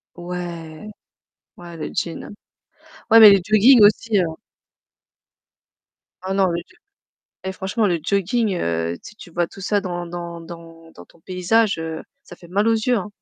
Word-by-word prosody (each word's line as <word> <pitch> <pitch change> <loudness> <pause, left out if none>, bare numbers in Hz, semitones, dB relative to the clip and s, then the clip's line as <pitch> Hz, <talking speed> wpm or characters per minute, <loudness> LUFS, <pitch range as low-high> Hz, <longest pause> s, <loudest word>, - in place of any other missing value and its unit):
Ouais, 175 +1 -7 0.7
ouais 170 -1 -11
le 155 - -6
jean. 165 -2 -4 0.8
Ouais, 225 0 +8
mais 215 -2 +11
le 200 - +6
jogging 215 +4 +6
aussi, 210 0 +3
hein. 165 -3 -1 1.9
Oh 190 - -1
non 195 -1 +2
le 170 - -2
jogg - - -23 0.7
et 190 - -3
franchement 195 +4 -1
le 170 -2 0
jooging, 200 +3 0
heu, 85 0 -2
tu 210 - -12
tu 175 - -13
vois 175 0 0
tout - - -13
ça 205 +1 0
dans 175 -2 -5
dans 170 0 -7
dans 165 -1 -13
dans - - -13
ton 170 - -24
paysage, 185 +2 0 0.4
ça - - -14
fait 175 - -16
mal 205 +5 0
aux 225 - +3
yeux, 235 +2 +1
hein. 200 0 -4
180 Hz, 165 wpm, -21 LUFS, 170-210 Hz, 1.9 s, mais